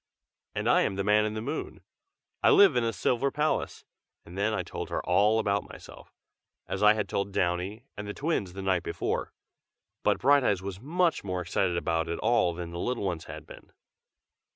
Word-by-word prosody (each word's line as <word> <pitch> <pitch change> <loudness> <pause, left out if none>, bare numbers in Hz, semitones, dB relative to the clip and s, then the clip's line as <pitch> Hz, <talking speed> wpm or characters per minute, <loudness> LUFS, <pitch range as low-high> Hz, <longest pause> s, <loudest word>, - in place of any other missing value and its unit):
"And - - -2
I - - +5
am - - 0
the 100 - -1
Man 105 +1 +3
in 110 0 -3
the 110 - -4
Moon. 145 +6 -5 0.6
I - - +5
live 200 -9 +7
in 120 - +2
a 115 - +1
silver 120 +8 0
palace 150 +2 -1 0.2
" - - -54
and 85 - -12
then 100 +3 +1
I 110 - -1
told - - -6
her - - -3
all 105 +5 +3
about 100 -2 0
myself, - - -13 0.5
as 95 +3 -4
I 105 0 +7
had 105 -2 -2
told 100 +1 -2
Downy 95 +6 -1
and 105 0 -6
the 105 - -4
twins 135 - -1
the 95 +1 -6
night 95 -2 +1
before. - - -3 0.7
But - - +2
Brighteyes 130 -8 +3
was 95 -1 -5
much 170 +4 +1
more 90 -2 -3
excited 90 0 0
about 80 -1 -1
it 85 - -2
all 90 -8 +2
than 85 -1 -6
the 85 - -6
little 125 +3 -2
ones 85 -5 -3
had - - -9
been. - - -14
100 Hz, 200 wpm, -28 LUFS, 90-120 Hz, 0.7 s, live